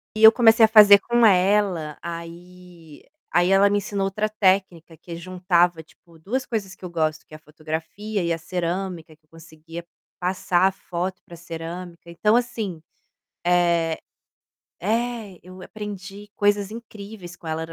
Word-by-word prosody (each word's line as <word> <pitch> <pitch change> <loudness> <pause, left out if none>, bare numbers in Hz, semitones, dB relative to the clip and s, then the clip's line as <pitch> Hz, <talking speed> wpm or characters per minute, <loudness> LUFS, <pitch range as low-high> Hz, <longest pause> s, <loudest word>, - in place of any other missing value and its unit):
E 215 - -1
eu 220 - +12
comecei 225 -1 +6
a - - +2
fazer 210 -2 +8
com 240 +2 +2
ela, 185 -5 +2
aí 170 -1 -10 0.3
aí 175 +1 +3
ela 195 +1 +5
me 205 - +1
ensinou 200 0 -3
outra 195 +2 -1
técnica 190 -5 0
que 170 +1 -9
juntava 175 -1 +1
tipo 165 +1 -22
2 250 +11 -3
coisas 205 -5 -4
que - - -23
eu 180 - -5
gosto 160 -2 -2
que - - -19
é - - -8
a - - -22
fotografia 160 +7 -5
e 170 -1 0
a - - -2
cerâmica, 175 -1 -4
que 155 - -43
eu - - -46
conseguia 165 +1 -11 0.3
passar 180 0 +1
a - - 0
foto 180 0 -5
pra 170 - -12
cerâmica. 170 +1 -8
Então 210 +6 +2
assim, 220 -8 -2 0.6
eh 170 -2 +2 0.8
é, 225 -1 -2
eu 185 +1 -13
aprendi 205 0 -8
coisas 205 0 +1
incríveis 210 -5 -10
com 170 -1 -11
ela, 160 0 -2
ela 165 0 -8
180 Hz, 165 wpm, -23 LUFS, 170-205 Hz, 0.8 s, eu